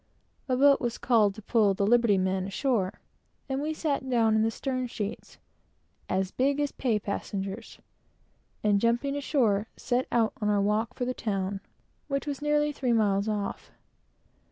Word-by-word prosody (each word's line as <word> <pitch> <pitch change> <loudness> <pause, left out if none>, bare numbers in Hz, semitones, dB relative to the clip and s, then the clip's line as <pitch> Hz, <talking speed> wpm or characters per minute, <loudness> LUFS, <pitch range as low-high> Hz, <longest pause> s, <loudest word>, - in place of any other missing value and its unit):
A 255 - +2
boat 280 +1 +5
was 240 -1 -2
called 215 -6 +3
to 215 - -11
pull 210 -3 +3
the 200 - +1
"liberty 235 -2 +4
men" 190 0 0
ashore, 200 -2 -1 0.5
and 270 0 -2
we 305 +2 -1
sat 285 -4 -2
down 230 -3 +3
in 220 - +3
the 225 - +2
stern 255 +2 -3
sheets, 210 -3 -6 0.7
"as 190 0 0
big 275 +2 +1
as 290 -1 0
pay 235 -5 0
passengers," 200 +1 -5 0.9
and 205 -1 +3
jumping 240 +5 +1
ashore, 235 -8 +1
set 250 +1 -1
out 230 -2 +2
on 210 - +1
our 205 -1 +3
walk 215 +4 0
for 250 - -2
the 255 - -1
town, 195 -4 -3 0.5
which 275 0 -2
was 285 -2 -4
nearly 295 0 +2
three 260 -4 0
miles 205 -2 +2
off. 205 -2 -3
230 Hz, 165 wpm, -28 LUFS, 200-265 Hz, 0.9 s, boat